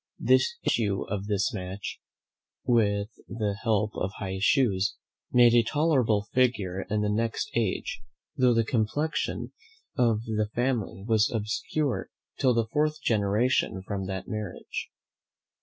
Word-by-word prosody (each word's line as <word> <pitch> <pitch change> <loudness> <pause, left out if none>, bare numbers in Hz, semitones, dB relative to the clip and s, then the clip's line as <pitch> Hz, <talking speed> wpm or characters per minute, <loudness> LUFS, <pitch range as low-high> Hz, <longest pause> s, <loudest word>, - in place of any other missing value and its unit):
The - - +5 0.2
issue 100 -4 +1
of 100 0 -3
this 105 +4 0
match, 95 -1 -5 0.7
with 105 -4 +2 0.2
the 105 -3 -2
help 110 -1 +1
of 95 - -2
high 95 -1 -4
shoes, 100 -5 +2 0.4
made 120 -1 +6
a 120 - +7
tolerable 120 -4 +2
figure 100 -7 +1
in 105 0 +1
the 105 - +1
next 115 +2 -1
age, 115 -5 -1 0.3
though 125 -2 +4
the 115 -1 +3
complexion 135 +7 -1 0.4
of 115 -4 +2
the 110 -2 -1
family 120 -6 -1
was 110 -2 +3
obscure 125 - -2 0.3
till 125 -3 +3
the 115 -1 +2
fourth 150 +1 +1
generation 105 -2 +1
from 95 -1 -4
that 95 -1 -4
marriage. 105 -5 -5
110 Hz, 130 wpm, -27 LUFS, 100-120 Hz, 0.7 s, a